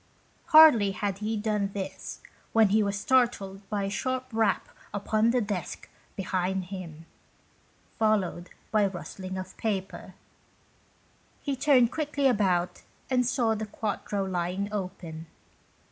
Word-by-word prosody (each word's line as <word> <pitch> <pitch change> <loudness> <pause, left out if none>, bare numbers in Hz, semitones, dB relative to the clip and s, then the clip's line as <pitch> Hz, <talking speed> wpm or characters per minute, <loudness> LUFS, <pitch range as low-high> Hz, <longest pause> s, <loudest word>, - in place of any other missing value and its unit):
Hardly 305 - +7
had 200 -2 -2
he 215 +1 -2
done 205 -2 -1
this 195 -2 -6 0.3
when 225 -2 +5
he 215 +2 +4
was 200 -1 -1
startled 220 -6 +1
by 205 -2 -1
a 195 - -1
sharp 255 +5 -2
rap 220 -4 +1 0.2
upon 215 +2 +1
the 245 +1 +2
desk 200 -5 -4 0.3
behind 185 0 -1
him, 175 -4 -8 0.9
followed 200 -5 +1 0.2
by 215 0 +3
a 200 - +3
rustling 185 +1 -7
of 185 0 -7
paper. 195 -4 -3 1.3
He 280 -2 -1
turned 255 -3 +4
quickly 290 -2 -1
about 190 -8 +2 0.3
and 250 -2 +3
saw 235 -3 +2
the 220 0 -4
quarto 205 -1 -3
lying 185 +2 -2
open. 180 -5 -5
205 Hz, 130 wpm, -28 LUFS, 190-225 Hz, 1.3 s, Hardly